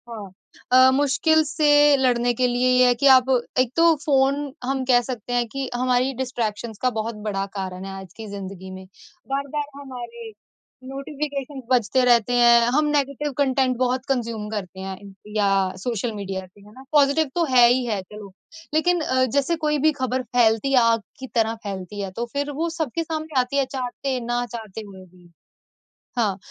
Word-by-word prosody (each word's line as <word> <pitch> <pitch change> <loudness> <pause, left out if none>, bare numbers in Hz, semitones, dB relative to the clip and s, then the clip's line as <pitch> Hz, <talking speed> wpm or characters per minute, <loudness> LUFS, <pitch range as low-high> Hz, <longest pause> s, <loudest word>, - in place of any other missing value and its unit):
हाँ। 210 -5 -8 0.4
अ, 255 +1 +7
मुश्किल 290 +4 +3
से 300 0 0 0.3
लड़ने 245 -2 +2
के 250 +1 +1
लिए 245 +1 +1
ये 255 0 +5
है 245 - +5
कि 280 - +5
आप 255 -1 +4 0.3
एक 255 -2 +2
तो 335 0 +5
फ़ोन 280 0 +1
हम 265 +1 -1
कह 245 -1 +4
सकते 245 -1 -6
हैं 240 -1 +1
कि 270 +2 -5
हमारी 255 +1 +1
डिस्ट्रैक्शंस 230 -3 -3
का 255 - +3
बहुत 220 +1 -3
बड़ा 195 -1 -1
कारण 185 -1 -5
है, 195 - -6
आज 190 -2 -14
की 220 0 -9
जिंदगी 190 -2 -8
में। 190 0 -9 0.5
बार-बार 280 +1 -2
हमारे 235 -4 -9 0.6
नोटिफ़िकेशंस 275 0 -5
बजते 250 +1 +2
रहते 240 -1 +3
हैं, 240 -1 +6
हम 300 +1 +3
नेगेटिव 290 0 -1
कंटेंट 265 -2 +1
बहुत 255 +1 0
कंज्यूम 230 -5 -2
करते 190 -4 -6
हैं 190 0 -6
इन 200 -1 -12 0.2
या 205 -2 +2 0.3
सोशल 230 +3 -3
मीडिया 195 -2 -5
पे 205 - -19
है 205 +1 -16
ना? 260 - -13
पॉज़िटिव 290 0 +3
तो 345 - +2
है 245 -2 +7
ही 245 +1 +2
है 210 -5 -2
चलो, 205 +1 -12 0.4
लेकिन 350 +2 +2 0.3
जैसे 285 +4 +1
कोई 300 0 +2
भी 310 +3 +4
ख़बर 260 0 -1
फैलती 240 +1 +2
है 265 - +5
आग 230 -1 +3 0.2
की 265 - -7
तरह 225 -1 +2
फैलती 195 0 -6
है, 195 -1 -4
तो 235 +6 -4
फिर 285 +1 -2
वो 320 +4 -2
सबके 320 0 -2
सामने 315 -3 -2
आती 250 +3 -3
है 275 - +2
चाहते, 260 0 -4
ना 240 +1 -1
चाहते 225 -3 -8
हुए 190 -2 -12
भी। 180 -1 -21 0.9
हाँ, 210 -5 +1
245 Hz, 185 wpm, -23 LUFS, 220-275 Hz, 0.9 s, अ